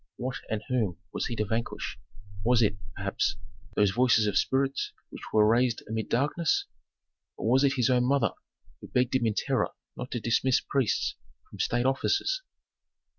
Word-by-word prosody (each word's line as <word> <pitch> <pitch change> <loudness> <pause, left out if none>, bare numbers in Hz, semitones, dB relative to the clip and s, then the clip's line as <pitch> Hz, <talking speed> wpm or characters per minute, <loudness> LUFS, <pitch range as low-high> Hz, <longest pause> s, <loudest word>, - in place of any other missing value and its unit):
What 125 0 -3
and 110 -1 -2
whom 110 -9 0 0.2
was - - -1
he 120 - -3
to 105 - 0
vanquish? 115 +3 -3 0.4
Was 120 +1 +4
it, 105 -1 +2 0.2
perhaps, - - -1 0.4
those 105 -2 +4
voices 115 0 +4
of 105 - 0
spirits 135 +1 +1 0.2
which - - -9
were 105 -1 +5
raised 120 +1 +2
amid 110 0 -3
darkness? 145 +6 +1 0.7
Or - - -3
was 135 +2 +5
it 140 -1 +4
his 125 -1 +2
own 125 -1 +3
mother, 140 +2 +2 0.5
who - - -10
begged 125 0 +1
him 125 -3 +2
in 105 - 0
terror - - +1 0.3
not 125 +1 -6
to 120 - -3
dismiss 120 +3 +2
priests 135 -5 0 0.3
from - - -13
state 120 +1 +1
offices? 395 - +1
125 Hz, 170 wpm, -28 LUFS, 110-130 Hz, 0.7 s, were